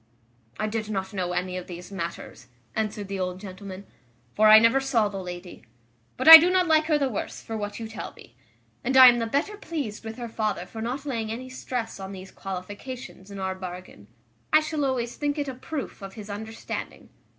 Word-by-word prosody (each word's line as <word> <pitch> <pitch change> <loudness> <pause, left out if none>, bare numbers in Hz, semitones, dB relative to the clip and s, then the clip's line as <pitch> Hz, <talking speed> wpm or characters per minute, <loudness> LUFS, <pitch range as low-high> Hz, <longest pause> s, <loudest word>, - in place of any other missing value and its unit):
"I 215 - 0
did 215 0 -3
not 190 -2 -3
know 180 -2 -2
any 180 0 -2
of 180 - -7
these 180 +2 -9
matters," 170 -3 -6 0.3
answered 210 -2 -2
the 195 0 -4
old 180 0 -3
gentleman, 190 0 -9 0.5
"for 215 +1 +4
I 215 0 +10
never 230 +4 +5
saw 245 -6 +1
the 195 -1 -5
lady: 180 -3 -8 0.5
but - - -2
I 325 0 +15
do 345 +3 +3
not 365 0 +3
like 315 -2 +4
her 310 -1 +3
the 280 -2 +1
worse 225 -6 -4
for 225 - -5
what 205 0 -4
you 225 - -5
tell 220 - -7
me; - - -16 0.5
and 265 +1 +1
I 260 -1 +12
am 240 0 +2
the 230 - -1
better 290 - -1
pleased 285 - -5
with 220 +1 -7
her 240 -1 -5
father 220 -2 -2
for 220 - -8
not 255 +5 -4
laying 225 -6 -3
any 255 +3 -6
stress 250 -4 -5
on 190 0 -7
these 190 0 -10
qualifications 200 +3 -8
in 200 - -8
our 190 -1 -2
bargain. 180 - -9 0.4
I 310 - +7
shall 305 -2 -2
always 245 -3 -2
think 290 0 -1
it 290 -1 -2
a 265 - -3
proof 270 -1 -6
of 195 0 -8
his 210 -1 -8
understanding. 220 +2 -7
220 Hz, 210 wpm, -26 LUFS, 195-260 Hz, 0.5 s, I